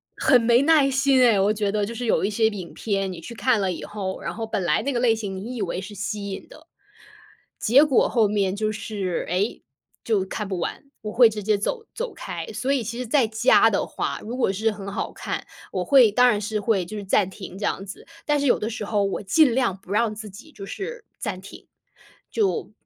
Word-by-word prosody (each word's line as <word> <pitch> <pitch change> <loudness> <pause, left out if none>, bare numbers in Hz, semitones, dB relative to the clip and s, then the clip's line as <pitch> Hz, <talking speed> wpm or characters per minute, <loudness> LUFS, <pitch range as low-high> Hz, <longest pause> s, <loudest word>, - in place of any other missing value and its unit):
很 250 - +4
没 235 +2 +4
耐 295 -2 +4
心 270 0 +3
诶， 230 -5 +5
我 200 +2 +3
觉 210 -1 -1
得。 210 -1 0
就 230 - -6
是 245 +1 -4
有 220 - +2
一 200 - +1
些 220 +1 +2
影 195 -5 -6
片， 195 -3 -2
你 175 - -8
去 235 +8 -9
看 245 -2 +2
了 190 -2 0
以 - - -7
后， 195 -3 -5
然 - - -4
后 225 0 -4
本 215 -3 -2
来 - - +2
那 280 - -1
个 240 - 0
类 240 -3 +4
型 205 -4 -5
你 225 +7 -6
以 - - -3
为 185 -1 -2
是 200 +2 -9
吸 200 +1 -4
引 190 - -7
的， 315 +2 -16 0.9
结 255 +6 +5
果 275 -5 +3
后 225 -3 +3
面 200 -2 0
就 215 +1 0
是， 200 -4 -3
诶， 185 +5 -1 0.4
就 210 -4 +1
看 205 +1 -5
不 190 -3 -3
完， - - -4 0.2
我 210 -1 -5
会 240 -1 +7
直 215 -1 -5
接 215 -1 +3
走 450 - -3
走 - - -4
开。 - - -6
所 270 +2 -1
以 265 -4 +1
其 235 +2 -5
实 250 - -3
在 240 -1 +2
家 225 +3 +4
的 - - 0
话， - - -3
如 240 +4 -5
果 240 -7 +1
是 220 +3 0
很 200 -1 -7
好 - - -3
看， - - -5 0.2
我 185 -1 -2
会， 250 -1 +6
当 250 +4 +5
然 210 -4 +2
是 215 +1 -2
会 200 -3 +1
就 215 +5 -8
是 205 - -5
暂 190 0 +2
停 190 -1 -9
这 200 - -6
样 195 -1 -2
子， 195 - -10 0.2
但 295 -1 +2
是 285 - 0
有 - - +4
的 210 - -2
时 220 -2 -5
候 205 -1 0
我 195 +1 -2
尽 255 +5 +4
量 250 -7 +1
不 195 0 -10
让 215 +1 +2
自 215 0 -7
己 205 +11 -13
就 195 -9 -10
是 475 - -6
暂 185 -2 -4
停， 190 - -12 0.6
就 415 -3 -1
215 Hz, 260 characters per minute, -24 LUFS, 200-245 Hz, 0.9 s, 会